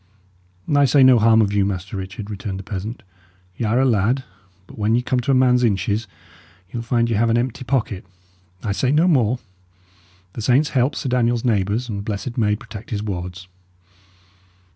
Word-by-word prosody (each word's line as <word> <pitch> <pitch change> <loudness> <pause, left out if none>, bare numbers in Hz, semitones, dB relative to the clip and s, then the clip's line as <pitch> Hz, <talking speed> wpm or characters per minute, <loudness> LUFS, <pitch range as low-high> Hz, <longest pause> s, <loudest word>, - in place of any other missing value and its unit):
"I 145 0 +5
say 135 +1 +5
no 130 -2 +7
harm 110 0 +5
of 100 -1 -1
you, 100 -1 +3
Master 95 0 -3
Richard," 95 +2 -6
returned 100 -1 -5
the 95 - -7
peasant. 105 +5 -6 0.5
"Y' 115 - -3
are 115 +4 +2
a 135 - +3
lad; 120 +2 +1 0.4
but - - -14
when 105 +2 +2
ye 120 - +1
come 125 0 0
to 125 +3 -4
a 135 - +4
man's 125 -1 +4
inches, 105 0 0 0.6
ye - - -10
will - - -2
find 115 0 +1
ye 115 - 0
have 115 +3 +2
an 115 - +3
empty 125 +2 -2
pocket. 120 -7 -1 0.6
I 105 - -1
say 125 +6 0
no 155 +5 +3
more: 125 -8 +2 1.0
the - - -6
saints 130 +6 +3
help 130 +2 +1
Sir - - -4
Daniel's 120 -1 +1
neighbours, 110 +1 0
and 105 -4 -4
the - - -4
Blessed 105 +4 -4
Maid 105 -3 +1
protect 105 +1 -10
his 105 -2 -3
wards!" 90 -2 -5
115 Hz, 195 wpm, -21 LUFS, 100-125 Hz, 1.0 s, no